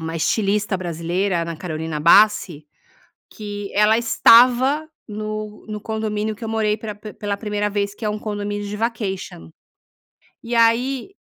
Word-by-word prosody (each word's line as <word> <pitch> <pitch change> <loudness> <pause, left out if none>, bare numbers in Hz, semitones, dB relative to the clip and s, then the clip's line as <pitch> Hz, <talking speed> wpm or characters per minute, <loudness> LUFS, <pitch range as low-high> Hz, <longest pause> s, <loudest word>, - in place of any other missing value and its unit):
uma 160 0 -4
estilista 205 +4 0
brasileira, 175 +1 -2
Ana 170 0 -4
Carolina 160 -2 -5
Bassi, 170 -3 +4 0.6
que 205 -1 -7
ela 210 +2 +4
estava 250 +5 +5 0.2
no 215 0 -6
no 210 -1 -6
condomínio 215 -1 -3
que 235 - -10
eu - - -4
morei 215 -1 0
pela 215 -1 -7
p 210 0 -10
pela 205 -1 -3
1º 210 0 -2
vez, 200 0 -2
que 220 - -8
é 210 - +1
um 210 - -3
condomínio 205 -1 -4
de 205 +1 -5
vacation. 195 - -4 0.9
E 235 +1 -4
aí 245 +9 +2
210 Hz, 150 wpm, -21 LUFS, 195-220 Hz, 0.9 s, estava